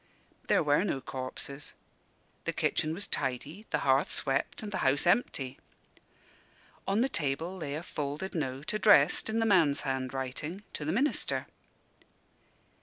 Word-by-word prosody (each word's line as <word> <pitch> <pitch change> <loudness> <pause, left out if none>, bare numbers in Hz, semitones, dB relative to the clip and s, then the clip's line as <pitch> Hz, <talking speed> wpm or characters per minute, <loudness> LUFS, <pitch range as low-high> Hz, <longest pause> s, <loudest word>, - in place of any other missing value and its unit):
There - - +4
were 145 +3 +3
no 175 -9 -1
corpses. 135 +2 -6 0.7
The - - -1
kitchen 155 - 0
was 200 - -1
tidy, 150 - -3
the - - 0
hearth 135 +1 +3
swept, 135 +9 +1
and 210 - -5
the 190 - -2
house 135 +1 +2
empty. 145 - +1 1.3
On 200 +3 +2
the 260 - +3
table 160 - -2
lay 150 -6 -4
a 160 - -4
folded 150 +4 -4
note, 140 -1 -3
addressed, 215 +1 +5
in 220 - -1
the 225 - +2
man's 170 -9 +4
handwriting, 135 +7 -3
to 150 - -5
the 155 - 0
minister. 270 - 0
150 Hz, 140 wpm, -30 LUFS, 135-190 Hz, 1.3 s, addressed